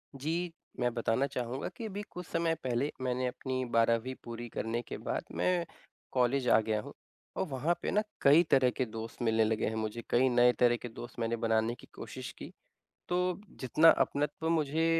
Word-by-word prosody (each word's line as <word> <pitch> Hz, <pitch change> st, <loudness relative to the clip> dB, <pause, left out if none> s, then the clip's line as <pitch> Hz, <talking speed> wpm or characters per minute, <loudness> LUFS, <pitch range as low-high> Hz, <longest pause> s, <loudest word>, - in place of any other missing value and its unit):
जी, 165 Hz, +5 st, -2 dB, 0.3 s
मैं 120 Hz, -1 st, +1 dB
बताना 120 Hz, +3 st, +1 dB
चाहूँगा 130 Hz, -1 st, -3 dB
कि 230 Hz, -, -5 dB
अभी 205 Hz, -1 st, -4 dB
कुछ 180 Hz, 0 st, -7 dB
समय 165 Hz, 0 st, 0 dB
पहले 130 Hz, +3 st, 0 dB
मैंने 125 Hz, 0 st, 0 dB
अपनी 130 Hz, +1 st, -3 dB
12वीं 115 Hz, +2 st, +3 dB
पूरी 120 Hz, 0 st, -6 dB
करने 115 Hz, +1 st, -2 dB
के -, -, -7 dB
बाद, -, -, -3 dB
मैं 180 Hz, -2 st, +1 dB, 0.5 s
कॉलेज 125 Hz, +1 st, +2 dB
आ -, -, +7 dB
गया 110 Hz, -1 st, 0 dB
हूँ। -, -, -10 dB, 0.4 s
और -, -, +1 dB
वहाँ 140 Hz, +5 st, 0 dB
पे -, -, -1 dB
ना 210 Hz, -, +3 dB, 0.2 s
कई 150 Hz, +5 st, +7 dB
तरह 130 Hz, -2 st, +5 dB
के 130 Hz, -, +1 dB
दोस्त 115 Hz, +1 st, -7 dB
मिलने 110 Hz, -1 st, +3 dB
लगे 110 Hz, 0 st, +1 dB
हैं 110 Hz, -, -2 dB
मुझे, 110 Hz, +1 st, -3 dB
कई 130 Hz, +2 st, +4 dB
नए 120 Hz, 0 st, +5 dB
तरह 120 Hz, -1 st, +5 dB
के 120 Hz, -, -5 dB
दोस्त 120 Hz, +1 st, -9 dB
मैंने 115 Hz, 0 st, 0 dB
बनाने 115 Hz, 0 st, +1 dB
की -, -, -16 dB
कोशिश -, -, -7 dB
की। -, -, -8 dB, 0.6 s
तो 180 Hz, +1 st, +1 dB, 0.2 s
जितना 155 Hz, +5 st, +5 dB
अपनत्व 150 Hz, +3 st, -2 dB
मुझे 160 Hz, 0 st, +1 dB
125 Hz, 190 wpm, -31 LUFS, 115-150 Hz, 0.6 s, आ